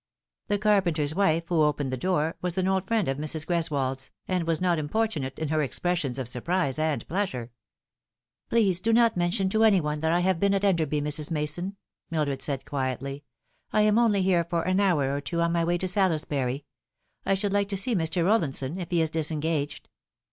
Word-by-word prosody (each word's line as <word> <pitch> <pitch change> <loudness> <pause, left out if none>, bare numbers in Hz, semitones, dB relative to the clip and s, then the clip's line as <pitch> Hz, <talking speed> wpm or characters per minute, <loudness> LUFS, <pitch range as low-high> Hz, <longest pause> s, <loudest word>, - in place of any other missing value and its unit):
The 205 - +1
carpenter's 180 -8 +2
wife, 170 -3 +2
who 170 -3 +2
opened 150 -3 +1
the - - -1
door, 165 +2 0
was 180 0 -2
an 185 0 +1
old 190 0 0
friend 225 -3 +1
of 135 +1 -1
Mrs. 155 +1 -2
Greswold's, 140 -6 -1 0.2
and 180 -3 -1
was 165 -1 +1
not 180 -3 +1
importunate 150 -4 -2
in 160 -2 -3
her 155 0 +1
expressions 145 -1 -1
of 130 -3 -3
surprise 135 +3 -1
and 155 -2 -1
pleasure. 145 - -3 1.0
"Please 200 -6 +3
do 225 +4 +1
not 230 -1 +4
mention 180 +3 +1
to 220 +3 +2
any 210 -4 +5
one 150 -2 -2
that 160 +1 0
I 175 +1 +2
have 185 -1 +1
been 200 +1 +2
at 195 - -1
Enderby, 160 -7 +1
Mrs. 150 +1 -1
Mason," 165 +5 -2 0.3
Mildred 145 -5 -1
said 135 -1 -3
quietly. 135 +1 -3 0.2
" - - -43
I 215 - +3
am 210 +1 +4
only 210 -5 +3
here 180 -2 +3
for 170 0 -2
an 185 +2 +1
hour 150 -9 +2
or 140 - -3
two 145 +5 -3
on 170 0 +2
my 170 0 +1
way 175 +1 +1
to 185 - -2
Salisbury. 150 -8 0 0.6
I 195 - +2
should 200 +1 -2
like 200 0 +1
to 200 - -2
see 240 +5 +1
Mr. 165 -2 0
Rollinson, 165 -6 0
if 175 - -5
he 170 -2 +2
is 160 - -2
disengaged." 155 -2 -2
165 Hz, 205 wpm, -26 LUFS, 150-190 Hz, 1.0 s, any